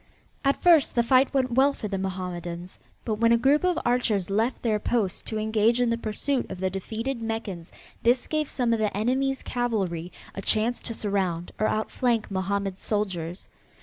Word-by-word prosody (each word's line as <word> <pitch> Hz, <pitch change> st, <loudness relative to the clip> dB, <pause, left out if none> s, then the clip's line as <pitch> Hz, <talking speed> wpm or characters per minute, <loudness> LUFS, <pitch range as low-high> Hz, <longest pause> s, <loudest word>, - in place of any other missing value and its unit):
At 275 Hz, 0 st, +2 dB
first 335 Hz, -5 st, +5 dB
the 235 Hz, -, +4 dB
fight 260 Hz, +3 st, +4 dB
went 260 Hz, -2 st, +1 dB
well 270 Hz, +4 st, +4 dB
for 215 Hz, -, -5 dB
the 195 Hz, -2 st, -3 dB
Mohammedans, 180 Hz, -2 st, -5 dB, 0.3 s
but 215 Hz, -2 st, -2 dB
when 230 Hz, 0 st, +4 dB
a 235 Hz, -, +6 dB
group 275 Hz, +6 st, +3 dB
of 365 Hz, -1 st, +2 dB
archers 220 Hz, -6 st, +1 dB
left 225 Hz, +5 st, 0 dB
their 215 Hz, -3 st, +1 dB
post 210 Hz, -5 st, -1 dB
to 220 Hz, -, -2 dB
engage 220 Hz, +2 st, +2 dB
in 245 Hz, -1 st, +2 dB
the -, -, +2 dB
pursuit 240 Hz, +5 st, -2 dB
of 190 Hz, -, -6 dB
the 190 Hz, 0 st, 0 dB
defeated 225 Hz, +6 st, -4 dB
Meccans 225 Hz, -7 st, -4 dB, 0.3 s
this 240 Hz, +2 st, +3 dB
gave 310 Hz, -2 st, -1 dB
some 240 Hz, -3 st, +1 dB
of 230 Hz, -, +1 dB
the 210 Hz, -2 st, 0 dB
enemy's 265 Hz, +5 st, 0 dB
cavalry 195 Hz, -9 st, -2 dB, 0.2 s
a 195 Hz, -, -5 dB
chance 220 Hz, +4 st, +1 dB
to 230 Hz, -, -3 dB
surround 190 Hz, -5 st, -1 dB
or 215 Hz, -, +3 dB
outflank 225 Hz, 0 st, 0 dB
Mohammed's 195 Hz, 0 st, -2 dB
soldiers. 185 Hz, -5 st, -2 dB
220 Hz, 180 wpm, -26 LUFS, 195-245 Hz, 0.3 s, a